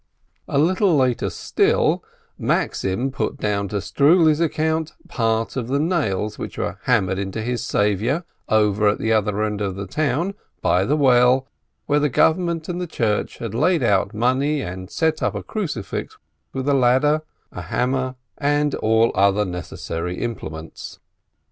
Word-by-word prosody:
A - - -1
little 180 +3 +3
later 130 -3 +1
still, - - +1 0.3
Maxim 100 +8 -1
put 140 - -2
down 100 -4 -1
to 105 - -6
Struli's 150 - +3
account 160 0 0
part 115 -8 -1
of 125 -4 -3
the 140 +3 0
nails 140 - -1
which - - -6
were - - -3
hammered 95 -6 +2
into 100 +2 -4
his 120 +1 -2
Savior, 105 - 0 0.3
over 105 -1 +3
at 105 - +2
the 110 0 0
other 105 -1 +1
end 105 -1 -2
of 95 -2 -2
the 100 +1 -5
town, 155 - -1 0.3
by 90 +1 +2
the 150 +6 +1
well, 130 -1 +4 0.4
where 145 0 +2
the 150 0 +1
Government 165 +4 +1
and 180 0 -3
the 180 - -3
Church 110 -9 -1
had 115 -3 -5
laid 160 +8 +2
out 100 -1 +2
money 130 +7 +1
and 95 -1 -6
set 160 +4 0
up - - 0
a - - -4
crucifix 175 - -4 0.3
with 130 +1 -4
a 145 - +3
ladder, 135 +4 +3 0.3
a - - -7
hammer, 130 +1 -1 0.2
and 145 0 +1
all 110 +1 +2
other 100 +2 +3
necessary 90 -1 -5
implements. 80 -9 -6
125 Hz, 155 wpm, -22 LUFS, 105-150 Hz, 0.4 s, well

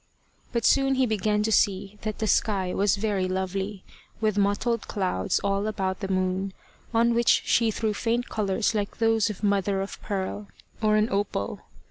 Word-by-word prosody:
But 235 -2 -1
soon 270 -1 +4
he 260 0 +3
began 210 -1 +1
to 220 - 0
see 200 0 +1
that 215 -1 -3
the 220 - -1
sky 195 -2 +1
was 200 -1 +2
very 200 -2 0
lovely, 190 +1 -3 0.4
with 215 -2 +1
mottled 205 +3 0
clouds 185 - 0
all 200 +1 0
about 190 -3 -2
the 195 - -3
moon, 185 0 -1 0.4
on 235 0 +3
which 235 0 +3
she 230 -1 +3
threw 220 0 -1
faint 235 +3 -1
colours 210 +1 0
like 205 -2 -2
those 225 -1 +2
of 210 0 -7
mother 200 -1 +1
of 195 +1 -5
pearl, 200 +1 -3 0.3
or 215 -1 +3
an 215 0 +3
opal. 195 - -2
205 Hz, 170 wpm, -26 LUFS, 195-220 Hz, 0.4 s, soon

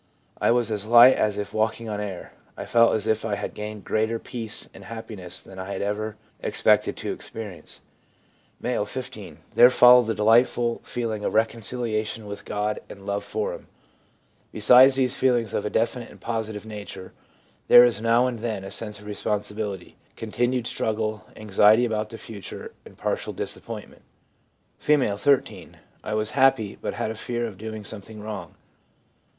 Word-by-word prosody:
I - - +3
was 120 -1 +2
as 105 0 -3
light 120 +3 +9
as 105 -1 0
if 105 -1 -4
walking 110 +1 -1
on 105 -1 -3
air. 100 -4 -6 0.2
I - - -5
felt 115 0 +4
as 110 - -2
if 110 0 +1
I 110 -2 -1
had 100 - -5
gained 105 -1 -7
greater 110 +3 0
peace 115 -2 -6
and - - -13
happiness 100 -6 -7
than 95 -1 -12
I 95 +1 -6
had 95 - -3
ever 105 +1 -3 0.2
expected - - +2
to - - -3
ex - - -6
perience/ 100 -8 -8 0.8
M., - - 0
15. - - -7 0.2
'There 120 - +8
followed 125 -2 +7
a 115 - 0
delightful 115 +2 +3
feeling 110 -3 -3
of - - -2
reconciliation 110 -1 -1
with 100 0 -8
God 105 0 -2
and 100 -1 -11
love 100 0 -2
for 105 +1 -3
Him/ - - -10 0.8
Besides 125 +5 +6
these 130 -1 +1
feelings 120 -4 +1
of 105 - -1
a - - -2
definite 115 +2 -1
and - - -15
positive 110 -2 -4
nature, 105 -3 -8 0.5
there 120 - +9
is 115 -3 0
now 115 +2 +3
and 125 -3 -2
then 110 -4 -3
a 95 - -8
sense 105 -1 -5
of 105 - -14
responsibility, 105 -2 -4 0.2
continued 120 +2 -1
struggle, 110 -2 -2
anxiety 110 +2 +4
about 110 -2 -2
the 115 - -8
future, 105 -5 -9
and - - -15
partial - - -2
dis - - -3
appointment. - - -9 0.8
F., 130 -9 +2
13. 140 +1 0 0.3
'I 105 - -4
was 110 0 -1
happy, 130 -6 +3
but - - -3
had 110 - -2
a - - -6
fear 120 +2 -3
of 105 -5 -8
doing 110 -1 -6
something 110 +1 -10
wrong.' 105 0 -7
110 Hz, 170 wpm, -25 LUFS, 105-115 Hz, 0.8 s, light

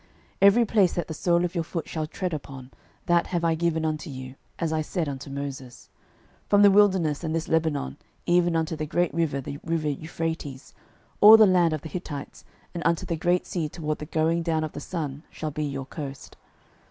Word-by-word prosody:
06:001:003 - - -32 0.4
Every 230 +4 +5
place 200 -5 +3
that 175 - -2
the - - -3
sole 170 +2 +2
of 175 - -4
your 170 -3 -1
foot 160 0 -5
shall 155 -2 -3
tread 180 +2 -4
upon, 135 -3 -7 0.3
that 175 0 +2
have 175 -2 -2
I 165 -1 +3
given 160 -1 0
unto 155 0 -3
you, 130 -1 -7 0.2
as 165 -2 -1
I 155 - +1
said 160 +1 -2
unto 140 0 -6
Moses. 135 -2 -7 0.6
06:001:004 - - -39
From 205 0 +5
the 200 - +8
wilderness 190 -7 +3
and 160 0 -2
this 165 0 -2
Lebanon 155 - 0 0.3
even 175 -1 +3
unto 160 0 0
the 155 -1 -4
great 175 0 0
river, 160 -4 0
the 140 +1 -6
river 165 -2 -1
Euphrates, 160 -2 -5 0.5
all 215 +2 +10
the 220 - +8
land 180 -4 +3
of 155 - -3
the 160 - -7
Hittites, 150 -5 -7 0.3
and 170 - -4
unto 170 -1 +1
the 170 - -2
great 175 +3 +1
sea 160 -4 -3
toward 155 -1 -4
the 150 - -7
going 165 +1 +1
down 160 -2 0
of 155 - -4
the - - -7
sun, 150 -3 -5
shall 155 -1 -5
be 150 +1 -3
your 135 -2 -4
coast. 140 -1 -8
160 Hz, 215 wpm, -26 LUFS, 150-175 Hz, 0.6 s, all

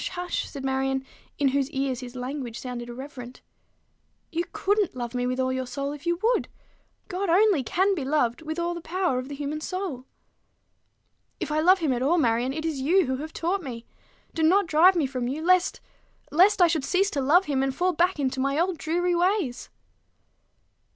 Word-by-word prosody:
hush!" 355 0 -3
said 275 -2 -7
Marion, 265 0 -1 0.3
in 280 -2 +3
whose 275 0 0
ears 270 -4 -2
his 250 -1 -9
language 250 -2 -5
sounded 245 -2 -6
irreverent. 250 0 -9 0.9
"You 340 +1 -1
couldn't 405 -5 0
love 240 -1 -5
me 245 0 -1
with 255 +1 -2
all 260 0 +1
your 260 -1 -3
soul 275 +3 -3
if 295 +3 -8
you 345 0 +1
would. 475 +2 +2 0.6
God 385 0 -3
only 380 -2 +4
can 380 - +1
be 325 -7 -3
loved 260 -2 0
with 315 +1 -5
all 345 0 -1
the 345 - -6
power 350 -6 -1
of 255 +2 -7
the 285 - -5
human 295 +2 -4
soul." 355 -8 -4 1.3
"If - - -3
I 305 - +1
love 365 +4 +5
him 315 -7 0
at 245 - -2
all, 305 +7 +3
Marion, 240 -3 +2
it 315 +3 -4
is 305 -5 -2
you 350 +6 +3
who 260 0 -1
have 310 +3 -6
taught 360 +5 -1
me. 240 -6 -7 0.5
Do 325 - -2
not 380 +6 +4
drive 335 +4 +5
me 325 -5 +2
from 255 -2 -3
you 290 +5 -3
lest 365 0 +3 0.5
lest 365 +4 +5
I - - +7
should 320 -4 0
cease 390 +7 +1
to 285 - -1
love 335 +8 +4
him, 275 -4 0
and 270 -1 -1
fall 360 +3 +1
back 350 +1 +1
into 265 -1 -1
my 275 +2 0
old 350 -1 0
dreary 350 +3 0
ways." 350 - 0
300 Hz, 200 wpm, -26 LUFS, 260-355 Hz, 1.3 s, I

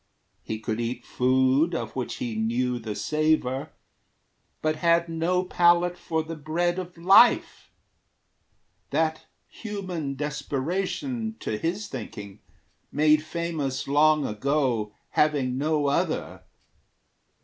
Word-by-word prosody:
He 110 - -4
could 110 +1 -3
eat 120 +2 -4
food 130 +6 +2
of - - -4
which 130 -2 -3
he 120 -2 -4
knew 120 +3 0
the 110 -2 -5
savor, 155 -2 0 0.9
But 155 0 +1
had 170 +1 +3
no 170 +3 0
palate 175 0 +3
for 160 -2 -2
the 165 +1 -6
Bread 170 +4 -1
of 180 -1 -8
Life, 195 +8 +5 1.2
That 160 +2 -1 0.2
human 185 -10 -5
desperation, 180 - -3
to 110 - -2
his 175 - -2
thinking, 105 -5 -8 0.5
Made 155 +1 +4
famous 155 -5 -3
long 150 +1 +4
ago, 120 -2 0 0.2
having 135 -4 +1
no 150 0 +1
other. 140 - -1
155 Hz, 110 wpm, -26 LUFS, 130-170 Hz, 1.2 s, Life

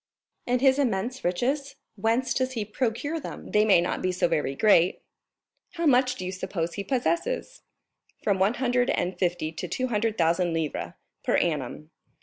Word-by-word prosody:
"And 245 0 +1
his 265 0 +4
immense 245 0 -1
riches, 270 +11 -1 0.2
whence 225 +5 +1
does 260 0 -1
he 220 -4 -2
procure 255 +8 -2
them?" - - -8
"They 210 0 +4
may 200 -5 +6
not 175 - -2
be 185 - +1
so 180 - +1
very 150 -5 -1
great." 185 -1 +4 0.7
"How 340 -1 -2
much 255 -3 +4
do 185 - -6
you 185 - -3
suppose 185 -3 -3
he 200 - -4
possesses?" 340 - -1 0.6
"From 200 -3 +1
one 200 +5 +3
hundred 245 -1 +1
and 180 0 -1
fifty 175 -4 0
to 160 - -5
two 255 0 -2
hundred 225 0 0
thousand 170 +1 +2
livres 160 -2 -3 0.3
per - - +1
annum." 150 -1 -2
215 Hz, 170 wpm, -26 LUFS, 175-255 Hz, 0.7 s, may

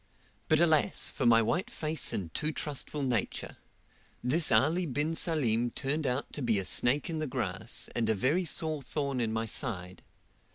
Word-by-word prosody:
But, 155 - +3
alas, 160 -3 +2
for 130 - -1
my 115 -1 +6
white 175 - -1
face 155 - -1
and 85 -5 -4
too 155 - -1
trustful 150 -1 -3
nature! 120 -6 -2 0.7
this 155 +6 +3
Ali 160 +10 +3
bin 145 +4 -1
Salim 120 -9 +1
turned 145 +4 -2
out 125 +2 -2
to 145 - -5
be 115 -4 +1
a 95 - -1
snake 135 - +2
in 165 -2 -3
the 155 - -2
grass, 130 - -3
a 120 - 0
very 120 - +1
sore 155 -2 0
thorn 140 -2 -2
in 110 -2 -1
my 110 +1 -1
side. 95 -6 -1
140 Hz, 170 wpm, -30 LUFS, 115-155 Hz, 0.7 s, my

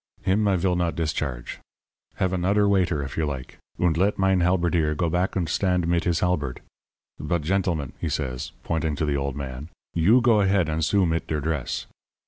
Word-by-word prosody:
Him 105 +3 +2
I 100 - +3
vill 90 0 +1
not 85 -1 0
discharge. 75 -7 -3 0.6
Have 95 -1 0
anoder 100 +3 +2
waiter 90 -7 +2
if 70 - -7
you 80 -2 +1
like, 65 -3 -6 0.2
und 90 -3 +2
let 100 +4 +2
mein 95 -1 +3
halberdier 85 -3 +2
go 85 +1 0
back 90 +2 0
und 90 -4 0
stand 90 +1 +1
mit 85 0 +1
his 85 -1 +1
halberd. 75 -8 -1 0.6
But, 75 +2 -1
gentlemen,' 85 -5 -1
he - - -2
says, 65 -1 -3
pointing 80 -2 -1
to 75 - -1
the 75 -1 0
old 70 -1 -2
man, 70 +2 -6 0.2
'you 95 +10 +5
go 115 -3 +4
ahead 95 -4 +2
and 80 +1 -1
sue 95 +5 +3
mit 80 -1 -1
der 75 - -1
dress. 80 -2 -2
85 Hz, 190 wpm, -25 LUFS, 75-95 Hz, 0.6 s, you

